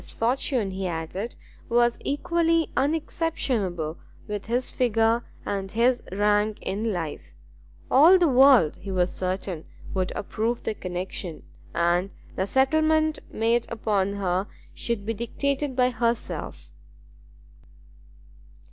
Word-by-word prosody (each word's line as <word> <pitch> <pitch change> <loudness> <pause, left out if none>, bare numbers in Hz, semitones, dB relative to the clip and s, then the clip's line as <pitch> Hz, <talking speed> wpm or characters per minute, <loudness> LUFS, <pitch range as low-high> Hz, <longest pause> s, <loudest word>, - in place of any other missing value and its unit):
His - - -10
fortune, 235 -3 0
he 190 0 -3
added, 175 +7 -4 0.3
was 240 0 +3
equally 330 +3 +1
unexceptionable 255 - -1 0.3
with 210 0 -5
his 245 +2 -1
figure 230 -1 +2 0.2
and 195 -1 -3
his 240 +2 +2
rank 210 +2 +2
in 210 +4 -1
life; 165 -6 -5 0.6
all 320 +8 +8
the 350 -2 +3
world, 255 - +6
he 190 +2 -7
was 180 -1 +1
certain, 185 -3 -3 0.3
would 185 -1 -1
approve 225 +4 -2
the - - -1
connexion, 180 -3 -5 0.3
and 175 +3 +2 0.3
the 190 - -1
settlement 310 +5 +2
made 230 +1 +1
upon 205 -3 0
her 190 -1 -1 0.3
should 230 -4 -3
be 225 - -1
dictated 275 +4 -2
by 250 0 +3
herself. 235 - -2
225 Hz, 115 wpm, -25 LUFS, 190-255 Hz, 0.6 s, all